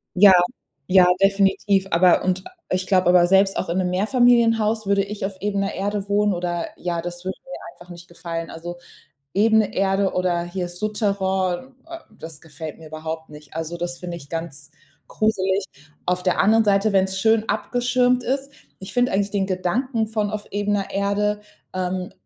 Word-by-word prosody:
Ja, 195 +1 +8 0.5
ja, 185 -1 +6
definitiv. 195 0 +2
Aber 175 +1 +4
und 185 0 0 0.3
ich 185 0 -1
glaube 185 -2 +3
aber, 180 -1 +5
selbst 195 +1 +3
auch 185 - -2
in 170 - -1
'nem 185 -1 0
Mehrfamilienhaus 225 +1 +3
würde 200 0 +2
ich 200 0 -5
auf 195 0 -5
ebener 200 0 -1
Erde 205 0 -3
wohnen 205 0 +2
oder 175 -1 -2
ja, 170 -1 -3
das 175 +1 -7
würde 190 0 -4
mir 265 - -10 0.2
einfach 175 - -16
nicht 175 0 -12
gefallen. 165 -1 -6
Also, 175 +2 -7 0.6
ebene 220 +1 +3
Erde 195 0 +1
oder 180 -2 0
hier 175 0 -4
Soutterain, 195 +3 -1
äh, 335 0 -8 0.2
das 160 -2 -10
gefällt 155 0 -9
mir 160 -1 -12
überhaupt 160 +1 -6
nicht. 150 -1 -14
Also, 165 +1 -4
das 175 0 -4
finde 175 -1 -6
ich 145 -4 -12
ganz 155 -3 -6 0.4
gruselig. 195 -2 0 0.4
Auf 180 0 0
der 180 -1 +1
anderen 220 +3 +4
Seite, 200 +1 +2
wenn's 190 0 +1
schön 220 +2 +2
abgeschirmt 245 0 +1
ist 275 +3 -2 0.3
Ich 190 - -9
finde 245 0 +1
eigentlich 200 +1 0
den 195 -2 0
Gedanken 220 +6 -1
von 215 -2 -1
auf 210 -1 -5
ebener 205 -1 -1
Erde, 205 +1 0 0.3
ähm, 185 0 -3
190 Hz, 170 wpm, -22 LUFS, 175-210 Hz, 0.6 s, Ja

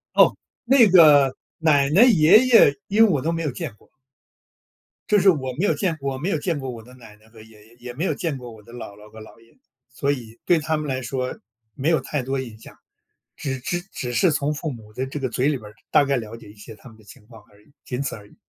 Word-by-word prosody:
噢， - - +5 0.3
那 245 -2 +5
个 150 -7 +6 0.3
奶 145 -4 +3
奶 185 +10 +5
爷 195 -4 +6
爷， 230 - +6
因 210 +3 +4
为 225 - +4
我 150 -8 0
都 165 - -1
没 165 0 -3
有 150 - -2
见 145 -2 -6
过。 - - -27 1.2
就 210 - +4
是 195 +1 +5
我 135 -7 0
没 180 - 0
有 - - +2
见 175 -5 -2
我 135 -1 -3
没 160 +8 -3
有 165 - 0
见 160 0 -3
过 135 -1 -6
我 115 -3 -8
的 125 +3 -17
奶 115 -4 -15
奶 110 +1 -25
和 110 -1 -16
爷 110 -1 -18
爷， 115 - -22
也 120 0 -10
没 155 +9 -3
有 - - 0
见 165 -8 -4
过 125 -2 -10
我 110 -2 -15
的 115 - -16
姥 120 -4 -9
姥 105 0 -16
和 110 - -13
姥 110 - -15
爷， 115 0 -25 0.3
所 140 +2 -2
以 120 -4 -7
对 175 -2 +3
他 155 +1 -2
们 150 0 -5
来 130 -1 -3
说 130 +1 -4 0.4
没 140 +4 -1
有 165 - +3
太 145 - -4
多 135 +2 -3
印 120 -4 -8
象， - - -15 0.6
只 135 -2 -5
只 175 +7 -3
只 125 -1 -5
是 180 +6 +3
从 150 0 -1
父 150 +1 -5
母 110 -4 -12
的 130 +4 -3
这 135 +3 -6
个 130 -2 -3
嘴 125 +3 -1
里 150 -2 0
边 110 - -14
儿， 105 - -19 0.2
大 150 -2 +4
概 140 -1 0
了 115 -1 -7
解 115 -3 -15
一 105 - -15
些 110 +2 -12
他 110 - -15
们 110 - -18
的 110 - -20
情 105 +1 -17
况 115 -2 -16
而 105 0 -23
已， 145 - -27
仅 125 +1 -5
此 140 - -4
而 105 -1 -14
已。 - - -22
135 Hz, 290 characters per minute, -22 LUFS, 115-160 Hz, 1.2 s, 个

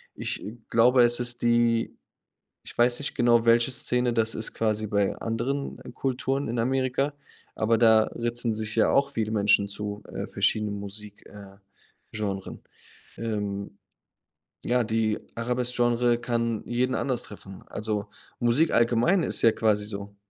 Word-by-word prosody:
Ich - - -3 0.3
glaube, 120 +2 +5
es 120 0 +3
ist 120 0 -1
die 120 -1 +2 0.7
ich - - -10
weiß 120 +2 +3
nicht 145 - -3
genau, 120 -1 +3
welche 115 +2 +4
Szene 125 -1 +2
das 115 -1 +1
ist 110 - -1
quasi 110 -1 -1
bei 100 -1 0
anderen 125 +5 -3 0.2
Kulturen 135 +1 -1
in 115 +1 -2
Amerika, 130 +3 0 0.4
aber 115 +1 +2
da 110 -2 +6
ritzen 120 -1 -1
sich 110 0 -4
ja 115 - +3
auch 140 0 +3
viele 110 -4 -2
Menschen 100 -1 +3
zu, 105 +1 -5
äh, - - -4
verschiedenen 105 -2 0
Musik 100 +1 -9
äh, 100 -1 -13 0.5
Genres. 100 -3 -4 0.6
Ähm, 100 -6 -4 0.9
ja, 125 0 +2
die 110 -1 0 0.2
Arabesk-Genre 120 0 +1
kann 115 -2 -1
jeden 125 +2 0
anders 130 -4 -1
treffen. 95 -2 -10
Also, 105 -1 -3 0.3
Musik 120 +7 +2
allgemein 120 +11 +3
ist - - +1
ja 115 - +6
quasi 105 -2 +1
so 100 -1 -6
115 Hz, 140 wpm, -26 LUFS, 105-120 Hz, 0.9 s, da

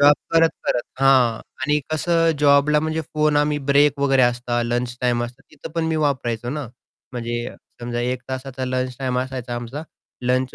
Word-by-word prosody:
Job 145 +1 +7 0.2
करत-करत 165 -6 +2 0.2
हां 130 -4 +4 0.2
आणि 150 +1 +2
कसं 165 +1 +2
जॉबला 145 +1 +4
म्हणजे 160 +1 -1
फोन 150 -1 +2
आम्ही 150 0 +2
ब्रेक 145 0 +4
वगैरे 135 -2 +4
असता 120 0 +1
लंच 120 +1 -2
टाईम 120 -1 +1
असतात 120 +3 -10
तिथं 150 +1 -10
पण 165 -1 0
मी 160 - 0
वापरायचो 120 -6 -1
ना. 145 -1 -4 0.5
म्हणजे 120 -1 -3 0.3
समजा 120 0 -3
1 125 +1 -1
तासाचा 130 0 -4
लंच 130 0 -2
टाईम 130 -2 -1
असायचा 130 -2 -4
आमचा 120 +5 -5 0.4
लंच 125 +1 0
130 Hz, 165 wpm, -22 LUFS, 120-150 Hz, 0.5 s, Job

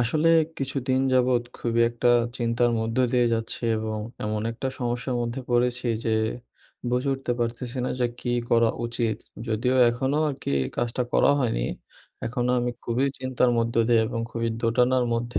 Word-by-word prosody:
আসলে 150 +8 +2 0.3
কিছুদিন 130 -1 0
যাবৎ 125 -1 +3 0.2
খুবই 115 -1 0
একটা 120 +1 +2 0.3
চিন্তার 120 0 +2
মধ্য 115 0 -2 0.2
দিয়ে 125 -1 +3
যাচ্ছি 115 +1 -4 0.2
এবং 110 0 -3 0.3
এমন 105 0 -1
একটা 120 +3 -3
সমস্যার 125 +1 -2
মধ্যে 120 +2 -3
পড়েছি 125 +1 +1 0.2
যে, 110 - +2 0.8
বুঝে 125 +3 0
উঠতে 135 -2 -3
পারতেছি 120 +2 -3
না - - -1
যে, 125 - +3
কী 120 - -2 0.2
করা 115 -1 +4 0.2
উচিত। 115 -1 -1 0.3
যদিও 120 +4 +1
এখনও 135 +5 0
আর 145 - -2
কি - - -1 0.2
কাজটা 120 +1 0
করা - - +5
হয়নি 110 - 0 0.6
এখনো 125 +1 -1
আমি 120 0 0
খুবই 120 +4 +1
চিন্তার 130 -1 +1
মধ্য 115 0 0
দিয়ে 115 -2 +5
এবং 115 0 -3
খুবই 115 0 -1
দোটানার 125 +2 +3
মধ্যে 120 +1 -2
120 Hz, 160 wpm, -25 LUFS, 115-125 Hz, 0.8 s, করা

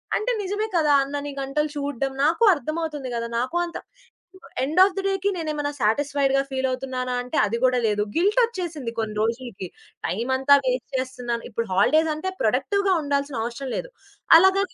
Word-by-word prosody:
అంటే 465 +4 0
నిజమే 410 +3 -2
కదా! 300 -3 +3
అన్నన్ని 285 +1 -4
గంటలు 300 +3 -1
చూడ్డం, 280 -2 -2
నాకు 330 +9 +2
అర్థమవుతుంది 310 -2 -4
గదా! 235 0 -2
నాకు 255 +7 -3
అంత 345 - -7 0.9
ఎండ్ 305 +7 0
ఆఫ్ 390 - +3
థ - - +1
డే‌కి 390 0 0
నేనేమైనా 300 -3 -2
సాటిస్‌ఫై‌డ్‌గా 275 +4 +2
ఫీలవుతున్నానా 260 -1 -2
అంటే, 250 - -4
అది 225 +3 -2
గూడా 255 -1 +3
లేదు. 210 -1 0
గిల్టొచ్చేసింది. 360 - 0
కొన్ని 215 -1 -3
రోజులికి. 230 -4 -3 0.4
టైమంతా 260 +7 +3
వేస్ట్ 255 -1 -1
చేస్తున్నాను. 250 -2 -3
ఇప్పుడు 230 +1 -3
హాలిడేసంటే, 315 - +2
ప్రొడక్టివ్‌‌గా 400 -5 +1
ఉండాల్సిన 280 -2 -1
అవసరం 240 +3 -5
లేదు. - - -4 0.5
అలాగని 380 +2 +3
280 Hz, 145 wpm, -24 LUFS, 255-330 Hz, 0.9 s, కదా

